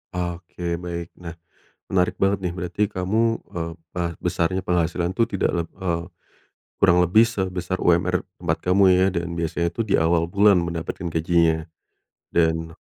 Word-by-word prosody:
Oke 85 -1 -4
baik. 85 -1 -5
Nah 85 -2 -8 0.5
menarik 90 -1 +1
banget 95 0 +3
nih 90 -1 -1
berarti 90 +2 -5
kamu, 110 +5 +1 0.2
eee, 85 -1 -3 0.2
bar 85 -1 -1
besarnya 90 +3 0
penghasilan 90 0 0
tuh 115 - +3
tidak 100 - +1
leb 80 - -13
eee, 85 -2 -1 0.8
kurang 90 +1 +6
lebih 100 +6 +5
sebesar 95 -5 -3
UMR 90 +1 +2 0.2
tempat - - 0
kamu 95 +2 +3
ya 90 +1 +4
dan 85 0 -2
biasanya 85 +1 -1
tuh 115 +5 -2
di 100 - 0
awal 85 0 +3
bulan 100 +1 +4
mendapatkan 85 +1 -3
gajinya. 80 -1 +2 0.7
Dan 80 -1 0
85 Hz, 150 wpm, -23 LUFS, 85-95 Hz, 0.8 s, kurang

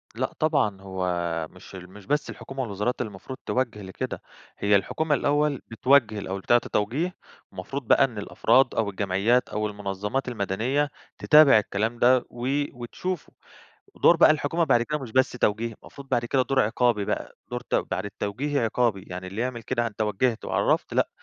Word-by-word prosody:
لأ، - - -2
طبعًا 135 -11 +1
هو 95 -1 -3 0.4
مش 90 +1 -13
ال 90 -1 -10
مش 100 +1 -14
بس 150 +1 0
الحكومة 135 0 -6
والوزارات 105 +1 -2
اللي 125 - -2
المفروض 105 +7 -9
توجّه 120 -5 -1
لكده، 95 -1 -5 0.4
هي 100 0 +3
الحكومة 150 +10 +1
الأول 145 -1 +1
بتوجّه 115 -2 +3
الأول، 95 0 -4
بتعطي 120 +4 +2
توجيه، 140 - -1 0.4
المفروض 110 +8 -6
بقى 140 - +6
إن 125 -5 -1
الأفراد 120 +5 +2
أو 110 -2 +1
الجمعيات 100 +5 +1
أو 105 0 -1
المنظمات 105 +5 -3
المدنية، 120 +6 -1 0.3
تتابع 150 -6 +7
الكلام 110 +3 -2
ده 125 0 +4
و 120 +1 -5 0.3
وتشوفه، 145 +9 -5 0.7
دور 170 - +7
بقى 165 - +7
الحكومة 155 +2 +1
بعد 125 -6 +3
كده 150 +5 -2
مش 130 -6 -8
بس 130 +1 +3
توجيه، 115 -1 0
المفروض 140 -1 -12
بعد 120 - +1
كده 130 +2 +2
دور 135 +1 +1
عقابي 115 -2 +1
بقى، - - -4
دور - - -3
ت - - -6
بعد - - -1
التوجيهي 120 +8 -3
عقابي، 115 -3 0
يعني 90 0 -7
اللي 95 +4 -5
يعمل 125 -2 -3
كده 120 +1 -1
أنت 110 -2 -8
وجّهت 110 +3 0
وعرفّت - - 0
لأ، - - +2
120 Hz, 170 wpm, -25 LUFS, 105-135 Hz, 0.7 s, تتابع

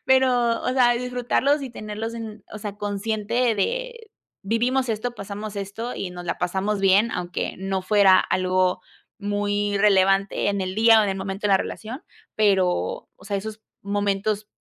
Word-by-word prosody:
pero 250 -3 +3
o - - -2
sea, 250 -2 +4
disfrutarlos 250 +4 0
y 265 - -5
tenerlos 220 0 -5
en, 220 -2 -8
o 215 - -6
sea, 205 -1 -6
consciente 215 +3 -1
de 480 - -3 0.3
vivimos 245 +5 +1
esto, 225 +2 -1
pasamos 205 0 -7
esto 200 +5 -5
y 185 - -4
nos 180 0 -8
la 170 - -3
pasamos 190 +3 -1
bien, 195 +4 +4
aunque 180 -3 -3
no 190 0 -2
fuera 195 -1 +5
algo 185 0 +1 0.4
muy 205 0 -1
relevante 195 -1 +3
en 200 -1 0
el 185 0 -3
día 225 0 +6
o - - +3
en 205 - 0
el 190 - -1
momento 195 +1 -3
de - - 0
la 195 - +6
relación. 230 - -6 0.3
Pero, 190 -4 +1
o - - -18
sea, 200 0 -2
esos 215 +2 -6 0.2
momentos 205 +1 -1
205 Hz, 170 wpm, -23 LUFS, 195-230 Hz, 0.4 s, día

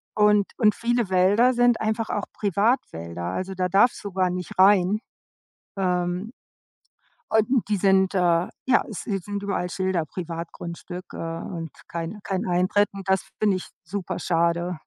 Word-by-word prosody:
Und 210 -1 +4
und 215 -3 +4
viele 235 -3 0
Wälder 200 +7 +4
sind 245 -1 +3
einfach 220 +1 -1
auch 205 - -1
Privatwälder. 195 - -1
Also 185 - -3
da 185 -1 0
darfst 205 +5 +3
du 200 - -5
gar 185 -1 +2
nicht 180 -1 -5
rein. 195 +1 +5 0.8
Ähm, 180 +3 -1 1.0
und 220 +2 +2
die 205 - +2
sind 190 0 +3
äh, 190 - +2 0.5
ja, 260 - +4
s 215 - -6
sie 200 -2 -1
sind 200 +2 -5
überall 195 -3 -2
Schilder, 185 -4 -1
„Privatgrundstück“, 170 +2 -7
äh, - - -7
und 165 0 -5 0.2
„kein 170 +5 -5
kein 190 -1 -2
Eintritt“ 185 +3 +2
und 195 -1 -8
das 190 -2 +3 0.2
finde 205 -3 +3
ich - - -8 0.2
superschade. 170 -1 -1
190 Hz, 150 wpm, -24 LUFS, 175-210 Hz, 1.0 s, rein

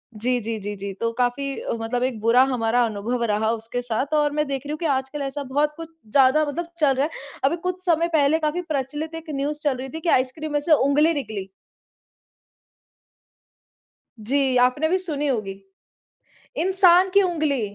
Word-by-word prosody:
जी, 245 +4 0
जी, 225 +1 -3
जी, 205 +1 -5
जी, 200 0 -6
तो 230 0 0
काफ़ी 245 +3 0 0.3
मतलब 235 +2 -2
एक 255 -3 -2
बुरा 230 +3 +5
हमारा 240 0 +1
अनुभव 230 +3 -2
रहा 215 +1 +1
उसके 230 +2 -4
साथ 245 +5 -2
और 295 -1 +1
मैं 300 0 0
देख 275 0 -4
रही 290 - -5
हूँ 305 - -3
कि 340 - -3
आजकल 270 0 -1
ऐसा 280 +1 -4
बहुत 290 +3 0
कुछ 330 -1 -8 0.2
ज़्यादा 280 +3 +4
मतलब 335 +4 -4
चल 285 -3 +4
रहा 270 +3 +1
है। 320 - -5 0.3
अभी 305 +5 +2
कुछ 365 0 -3
समय 335 -1 +2
पहले 305 +1 +3
काफ़ी 315 +3 -1
प्रचलित 295 +4 -3
एक 325 0 -8
न्यूज़ 290 +2 -2
चल 285 -4 +1
रही 265 +1 -6
थी 320 +5 -6
कि 335 - -1
आइसक्रीम 280 +4 0
में 295 - +2
से 310 +2 +2
ऊँगली 300 +4 +3
निकली। 215 -9 -5 2.8
जी 265 +1 +2
आपने 255 +6 +2
भी 370 - +2
सुनी 305 -6 -3
होगी। 195 -7 -3 1.0
इंसान 370 0 +4
की 400 - +6
उँगली 310 -7 0
275 Hz, 185 wpm, -23 LUFS, 245-310 Hz, 2.8 s, की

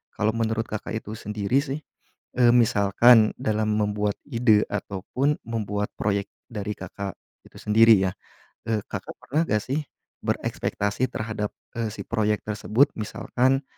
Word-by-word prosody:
kalau 110 +1 +1
menurut 115 0 0
Kakak 110 - -4
itu 110 -1 -5
sendiri 105 +5 0
sih, 140 0 -4 0.6
eee, 120 -1 +7
misalkan 110 0 +5
dalam 110 0 0
membuat 105 -1 0
ide 115 -5 +4
ataupun 105 +8 -1
membuat 105 -2 -2
proyek 100 -1 0 0.2
dari 105 -1 -3
Kakak 95 +1 -6 0.3
itu - - -23
sendiri 110 +1 +6
ya, - - -5 0.6
eee, 110 -1 +2
Kakak - - -6
pernah 150 +5 0
gak 105 - +3
sih 145 +4 -2 0.4
berekspektasi 105 +5 -1
terhadap, 110 -1 -3 0.3
eee, 115 -2 -1
si - - -7
proyek 105 -2 +1
tersebut, 105 +5 +3
misalkan 120 +5 0
110 Hz, 135 wpm, -25 LUFS, 105-120 Hz, 0.6 s, eee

